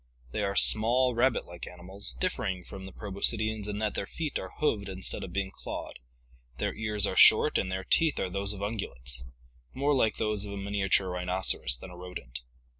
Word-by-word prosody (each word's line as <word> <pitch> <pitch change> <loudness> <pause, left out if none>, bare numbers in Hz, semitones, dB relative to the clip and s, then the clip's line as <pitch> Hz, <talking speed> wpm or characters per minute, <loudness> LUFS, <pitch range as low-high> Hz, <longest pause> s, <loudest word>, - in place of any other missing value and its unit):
They - - -2
are 100 -1 -1
small, 120 +5 +5
rabbit 120 +2 +2
like 85 0 -9
animals, 90 +3 -3
differing 110 - -2
from 95 +2 -9
the - - -9
proboscideans 110 +1 -1
in 105 -1 -4
that 105 0 -1
their 100 - -3
feet 155 -3 -3
are 95 - -7
hoofed 105 -10 0
instead 95 -1 -4
of - - -7
being 95 0 -2
clawed; - - -7 0.6
their - - -2
ears 105 -2 0
are - - -2
short - - +7
and 95 - -2
their 95 0 -3
teeth 160 +9 +3
are 95 - -2
those 100 +2 0
of 100 - -9
ungulates 65 - -4 0.3
— - - -34
more 140 +2 +1
like 115 -5 +2
those 105 -2 0
of 100 -1 -5
a - - -6
miniature 100 -1 +1
rhinoceros 90 -7 0
than 90 +9 -11
a - - -11
rodent. 90 -9 -8
100 Hz, 195 wpm, -29 LUFS, 95-110 Hz, 0.6 s, short